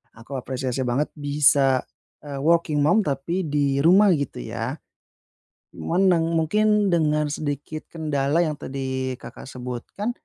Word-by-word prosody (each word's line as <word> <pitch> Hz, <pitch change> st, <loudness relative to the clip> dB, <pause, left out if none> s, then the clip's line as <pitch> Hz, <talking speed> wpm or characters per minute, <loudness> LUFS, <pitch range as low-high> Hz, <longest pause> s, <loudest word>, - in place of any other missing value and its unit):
Aku 115 Hz, +5 st, -7 dB
apresiasi 130 Hz, 0 st, -3 dB
banget 130 Hz, +5 st, 0 dB
bisa, 140 Hz, -2 st, +3 dB, 0.4 s
eee, 145 Hz, -1 st, -6 dB
working 160 Hz, 0 st, +2 dB
mom 180 Hz, +8 st, +4 dB
tapi 145 Hz, +6 st, -2 dB
di 145 Hz, -3 st, 0 dB
rumah, 190 Hz, +6 st, +6 dB
gitu 140 Hz, -, -4 dB
ya. -, -, -4 dB, 1.0 s
Cuman, 190 Hz, +3 st, +1 dB
deng 165 Hz, -2 st, +3 dB
mungkin 210 Hz, +5 st, +2 dB
dengan 150 Hz, -3 st, +2 dB
sedikit 145 Hz, +1 st, -4 dB
kendala 150 Hz, -1 st, 0 dB
yang 155 Hz, -3 st, -1 dB
tadi 130 Hz, -1 st, -3 dB
Kakak -, -, -10 dB
sebutkan, 125 Hz, -, -5 dB
145 Hz, 130 wpm, -23 LUFS, 135-165 Hz, 1.0 s, rumah